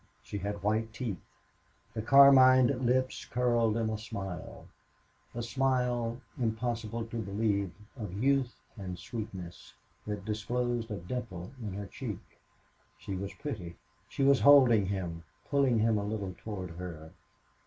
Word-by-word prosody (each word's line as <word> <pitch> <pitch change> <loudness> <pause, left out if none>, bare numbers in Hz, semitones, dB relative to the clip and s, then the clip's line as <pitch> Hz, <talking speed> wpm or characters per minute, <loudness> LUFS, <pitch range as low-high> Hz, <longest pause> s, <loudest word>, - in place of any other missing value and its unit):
She 100 +11 -5
had 100 +1 -4
white 110 +2 0
teeth. 115 -5 -4 0.7
The 110 - -3
carmined 130 0 +7
lips 130 +1 +1
curled 120 -2 +1
in 115 -1 0
a 110 - -3
smile 95 -7 -6 0.7
a 120 - -3
smile, 125 -2 0 0.2
impossible 115 0 -2
to 115 0 -4
believe, 100 -1 0 0.3
of 105 -8 -6
youth 130 0 +2 0.2
and 95 -3 -5
sweetness, 105 -7 -7 0.3
that 105 -2 -4
disclosed 120 +2 -1
a 105 - -3
dimple 90 -2 -5
in 105 -4 -4
her 100 +1 -5
cheek. 95 - -8 0.6
She 100 - -6
was 95 +1 -4
pretty. 95 - -6 0.3
She 140 - -1
was 140 -1 +5
holding 125 -8 +7
him, 90 -4 -3 0.3
pulling 135 -4 +3
him 110 -1 +3
a - - -3
little 100 -2 -3
toward 95 -4 -6
her. 85 -2 -8
110 Hz, 135 wpm, -31 LUFS, 100-125 Hz, 0.7 s, carmined